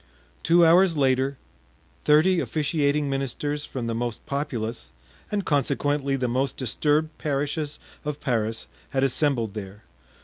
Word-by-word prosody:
Two 170 0 +5
hours 170 0 +5
later, 135 0 +2 0.7
thirty 160 +5 +5
officiating 150 -2 0
ministers 140 +2 -2
from 125 -3 -5
the 115 - -1
most 120 0 -3
populous, 120 - -3 0.4
and 205 -3 -1
consequently 140 0 +1
the 130 -2 -1
most 130 +3 -1
disturbed 150 +5 +1
parishes 145 +1 -2 0.3
of 150 -1 -4
Paris 115 -3 -1 0.2
had 135 0 0
assembled 130 -5 +1
there. 105 0 -8
140 Hz, 125 wpm, -25 LUFS, 125-150 Hz, 0.7 s, Two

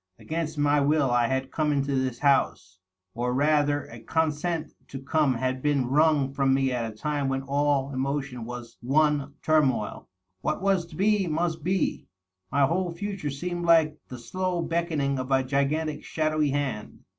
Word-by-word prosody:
Agaiinst 160 -1 -4
my 145 0 +3
will 145 -2 +2
I 120 -1 +3
had 130 +1 -2
come 155 -1 0
into 140 -1 0
this 130 -2 -1
house— 125 -9 +1 0.3
or 125 +1 -1
rather 145 0 +2
a 115 - -11
consent 160 +4 -1 0.2
to 135 - -7
come 140 0 +1
had 130 +2 -2
been 145 -3 +1
wrung 145 0 +2
from 135 -1 +2
me 135 -1 +1
at 115 -2 -2
a - - -15
time 145 +1 -1
when 135 0 -1
all 140 0 0
emotion 135 -2 -2
was 120 0 -8
one 145 +2 +1
turmoil. 135 -9 +1 0.3
What 150 - -1
was 190 -3 +1
to 165 - -12
be, 200 +1 +2
must 165 0 -1
be. 185 +1 -1 0.4
My 140 0 +4
whole 175 +4 0
future 195 -3 -4
seemed 175 +5 -4
like 160 -2 +4
the 125 - -8
slow 180 +7 -2
beckoning 155 -6 -1
of 130 +1 -4
a 135 -1 +3
gigantic 145 +3 -1
shadowy 155 -1 0
hand. 135 -6 -3
145 Hz, 170 wpm, -26 LUFS, 135-160 Hz, 0.4 s, My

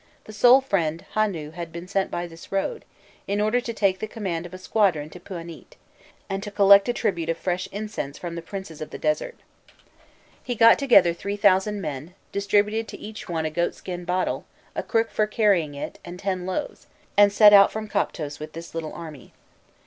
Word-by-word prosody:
the 215 - -11
"sole 245 +5 +6
friend" 170 -10 -1
Hûnû 180 -8 -1
had 170 -1 -6
been 170 +2 -8
sent 195 0 0
by 175 - -3
this 165 -1 -13
road, 195 - -2 0.4
"in 200 +1 -1
order 215 +4 +2
to 235 - -4
take 195 -4 +1
the 215 - -4
command 180 -6 -4
of 175 - -17
a - - -7
squadron 185 -6 +1
to 180 - -10
Pûanît, 170 -3 -9 0.5
and 195 -1 -3
to 205 - -6
collect 200 +1 +6
a - - +4
tribute 170 -8 -1
of 165 - 0
fresh 185 +1 -2
incense 205 -9 -5
from 175 -1 -6
the 170 - -5
princes 170 -3 -8
of 155 - -5
the - - -7
desert." - - -1 1.1
He 245 - -3
got 230 +1 +6
together 200 -11 +5
three 200 +4 -4
thousand 200 0 +3
men, 155 +2 -6 0.2
distributed 205 +2 +1
to - - -8
each 215 -2 -9
one 160 -2 -1
a 155 - -2
goatskin 175 +2 -3
bottle, 180 +1 -1 0.3
a - - -1
crook 225 0 0
for 215 - +1
carrying 195 -9 +2
it, 140 - -6
and 175 +1 -8
ten 185 -1 -3
loaves, 240 +11 -4 0.3
and 205 0 +6
set 205 0 +7
out 200 -1 +8
from 220 0 -5
Koptos 150 -7 -2
with 155 +1 -8
this 165 +1 -9
little 165 -2 -5
army. 155 -6 -10
190 Hz, 195 wpm, -24 LUFS, 170-210 Hz, 1.1 s, out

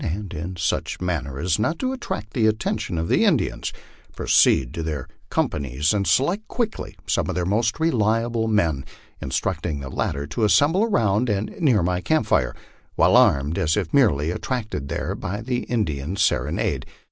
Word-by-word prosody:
243 90 -1 -4
and, 85 +3 -4
in 95 - -7
such 80 - -1
manner 85 -7 -3
as 85 +4 0
not 155 +10 0
to 260 +6 -1
attract 110 - -5
the 110 -4 +3
attention 110 -3 -1
of 80 +1 -1
the - - +3
Indians, - - +1 0.4
proceed 65 0 +3
to 85 - -4
their 75 -4 -4 0.2
companies 70 +1 0
and 100 -2 0
select 180 +11 +2
quickly 230 -3 -3
some - - 0
of - - -2
their 90 -1 0
most 110 - 0
reliable 115 -5 +1
men, 85 -11 +1 0.4
in - - -4
structing 80 +1 -2
the 70 -1 -6
latter 70 +2 -2
to 75 +10 -3
assemble 150 - +4
around 115 - +1
and 105 0 -1
near 125 - +3
my 90 +1 0
camp 155 - +1
fire, 65 - +1 0.4
well - - +5
armed, 70 +4 +4
as 80 +3 +1
if 95 -6 -2
merely 85 - +3
attracted 110 - -3
there - - -2
by 100 +4 -4
the 125 +1 -2
Indian 85 - -2
serenade. - - 0
100 Hz, 175 wpm, -23 LUFS, 80-115 Hz, 0.4 s, well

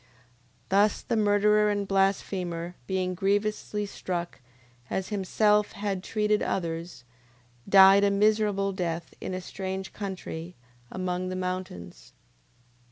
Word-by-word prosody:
9:28. 125 - -31 0.6
Thus 205 +2 +3
the 235 - -1
murderer 210 0 +3
and 205 -1 -1
blasphemer 185 -3 0
being 185 -1 -1
grievously 205 +2 -1
struck, 175 -5 -5 0.5
as 190 - -2
himself 210 +1 +2
had 200 -2 -3
treated 210 0 +1
others, 165 -5 -3 0.7
died 195 +1 +8
a 200 - +4
miserable 205 -1 +2
death 170 -3 -4
in 185 - -4
a 185 - -4
strange 190 +1 -5
country, 180 -4 -6 0.3
among 185 0 -3
the 185 - -4
mountains. 180 - -6
195 Hz, 115 wpm, -27 LUFS, 180-205 Hz, 0.7 s, died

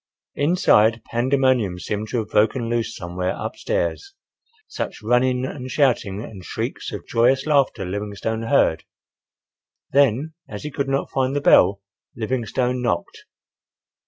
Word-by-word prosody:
Inside, 115 - +3
pandemonium 125 -5 +2
seemed 105 +3 -4
to - - -2
have 110 -2 -2
broken 115 +3 +2
loose 115 -1 -1
somewhere 90 +1 -3
up - - -5
stairs, 400 -1 -2 0.5
such - - -5
running 125 +2 +2
and 130 -1 -6
shouting 115 -7 +1
and 100 -6 -10
shrieks - - -4
of - - -7
joyous 125 +3 +2
laughter 140 -9 +2
Livingstone 105 +3 -3
heard. 80 - +3 1.1
Then, 140 +3 +2 0.2
as 105 -1 -7
he 150 - -5
could 140 0 -2
not 135 0 -1
find 135 0 0
the - - +2
bell, 100 -6 +5 0.3
Livingstone 125 +2 -1
knocked. 85 -9 -2
120 Hz, 130 wpm, -22 LUFS, 105-135 Hz, 1.1 s, bell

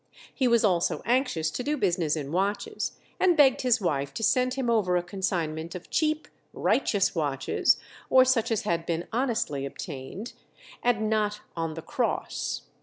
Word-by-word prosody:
He 260 - +1
was 235 -1 +4
also 175 -4 +1
anxious 240 - +1
to - - -3
do 295 +4 -1
business 175 - +1
in 145 -2 -4
watches, 195 +4 -1 0.3
and 355 -3 +4
begged 270 -3 +5
his 250 -3 +3
wife 140 -7 -1
to 225 - -3
send 255 +2 +2
him 265 -2 -2
over 205 -6 +2
a 175 - -1
consignment 175 -3 -3
of 180 - -9
cheap 310 0 +1 0.3
"righteous" - - +1
watches, - - +1 0.3
or 260 0 +7
such 255 -4 +2
as 225 -3 0
had 165 -1 -1
been 170 0 -2
honestly 230 - 0
obtained, 140 - -7 0.5
and 225 -3 +1
not 210 -1 0
"on 165 -2 -3
the 165 - -7
cross." - - -2
205 Hz, 165 wpm, -27 LUFS, 165-250 Hz, 0.5 s, or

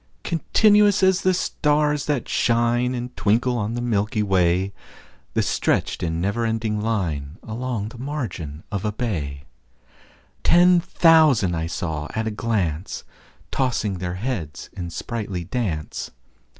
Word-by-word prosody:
Continuous 205 +4 +4
as 190 -1 +4
the 185 - +3
stars 150 -4 +1
that 145 -5 0
shine 120 +2 +2
And 125 +1 -5
twinkle 115 +6 +2
on 115 0 -2
the 120 - -2
milky 105 -2 0
way, 95 0 +2 0.6
The - - +3
stretched - - 0
in 80 -2 -1
never 100 +6 0
ending 110 -2 -1
line 85 -9 -2
Along 110 -2 -3
the 120 - -12
margin 105 - -5
of 100 -3 -2
a 105 - 0
bay: 80 - -3 1.0
Ten 175 +1 +6
thousand 140 - +4
saw 80 -3 -3
I - - -1
at 110 - -1
a - - -1
glance, 100 -7 -2 0.5
Tossing 115 -8 0
their 90 0 -3
heads 95 - -4
in 90 -2 -5
sprightly 100 -1 -4
dance. 90 -6 -3
110 Hz, 135 wpm, -23 LUFS, 90-125 Hz, 1.0 s, Ten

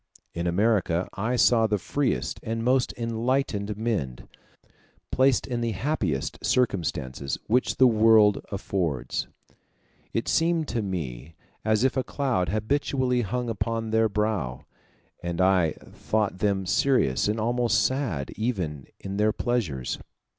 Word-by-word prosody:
In 85 +1 -2
America 90 -2 +1
I 110 +5 -1
saw 115 -2 +4
the 105 -1 +1
freest 130 +8 -1
and 115 0 -3
most 125 +1 +2
enlightened 115 -3 -1
men, 100 - -2 0.8
placed 130 0 +3
in 120 -2 -3
the 115 -1 -1
happiest 95 - -2
circumstances 80 - 0
which 125 +4 +1
the 130 - +5
world 110 -3 +5
affords: 95 -7 -2 0.8
it - - -2
seemed 165 -1 +2
to 115 - -1
me 80 - -5 0.3
as 110 +1 +2
if 130 - +2
a 130 - +1
cloud 125 - -1
habitually 125 +3 0
hung 120 +3 -2
upon 115 0 -2
their 110 0 +3
brow, 100 - -2 0.6
and 85 0 -4
I 95 -4 +3 0.2
thought 105 -4 -1
them 100 -2 +1
serious 90 - +2
and 105 +2 0
almost 120 +2 +2
sad 125 - -1
even 90 - -3
in 95 0 -5
their 105 +1 +3
pleasures. 100 - -2
110 Hz, 130 wpm, -26 LUFS, 90-120 Hz, 0.8 s, the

